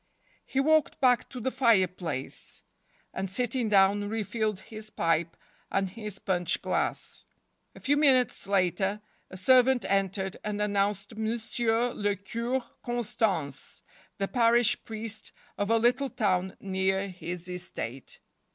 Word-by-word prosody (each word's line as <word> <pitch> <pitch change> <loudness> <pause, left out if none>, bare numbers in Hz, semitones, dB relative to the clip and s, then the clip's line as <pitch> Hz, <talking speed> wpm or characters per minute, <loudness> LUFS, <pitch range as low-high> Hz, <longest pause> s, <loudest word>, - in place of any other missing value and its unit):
He 270 - -1
walked 310 +2 +3
back 250 -2 +3
to 255 - -7
the 260 +3 -1
fire 230 -8 +4
place, 160 -8 -6 0.5
and, 190 0 -3
sitting 240 +2 0
down, 205 0 +4
re 220 0 -1
filled 215 -1 -2
his 215 -1 -8
pipe 165 -3 0 0.3
and 195 -1 0
his 210 -2 -6
punch 180 -3 0
glass. - - -2 0.5
A - - -11
few 285 - +2
minutes 260 -8 +3
later 195 +1 +1 0.3
a 190 - -8
servant 255 +5 +4
entered 195 0 0
and 210 0 -3
an¬ 210 0 0
nounced 200 +1 0
Monsieur 230 +2 0
le 205 -1 0
Cure 235 +6 -2 0.2
Constance, 220 - -2 0.3
the 195 - -1
parish 235 -1 +3
priest 220 -1 -5 0.2
of 205 +1 -2
a 230 - +4
little 250 +4 +2
town 190 -5 0
near 190 0 0
his 175 -1 -6
estate. 175 -8 -6
210 Hz, 135 wpm, -28 LUFS, 190-235 Hz, 0.5 s, fire